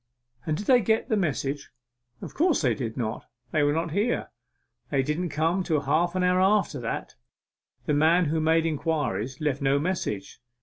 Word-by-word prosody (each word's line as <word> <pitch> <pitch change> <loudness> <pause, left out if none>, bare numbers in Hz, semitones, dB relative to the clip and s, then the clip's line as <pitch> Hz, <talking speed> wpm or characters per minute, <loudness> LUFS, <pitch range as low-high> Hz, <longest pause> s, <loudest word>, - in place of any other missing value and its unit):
'And 155 -1 0
did 205 - -5
they 250 0 +5
get 220 +5 +1
the 220 - +2
message?' 145 -6 -2 0.5
'Of - - -7
course 325 - +2
they 125 -4 +3
did 115 0 -5
not 115 -2 -3 0.2
they 155 - +2
were 145 0 +3
not 165 +2 -1
here 210 +8 -1 0.6
they 135 -2 +1
didn't 160 +5 -2
come 160 +5 0
till 160 -5 0
half 170 +6 +1
an 185 - +1
hour 180 0 +3
after 190 -7 +2
that. 115 -1 -4 0.7
The 150 - +1
man 160 +4 +4
who 160 +1 0
made 160 +1 +3
inquiries 145 - -2
left 145 -3 -1
no 140 0 +3
message. 145 - -3
155 Hz, 180 wpm, -26 LUFS, 140-180 Hz, 0.7 s, they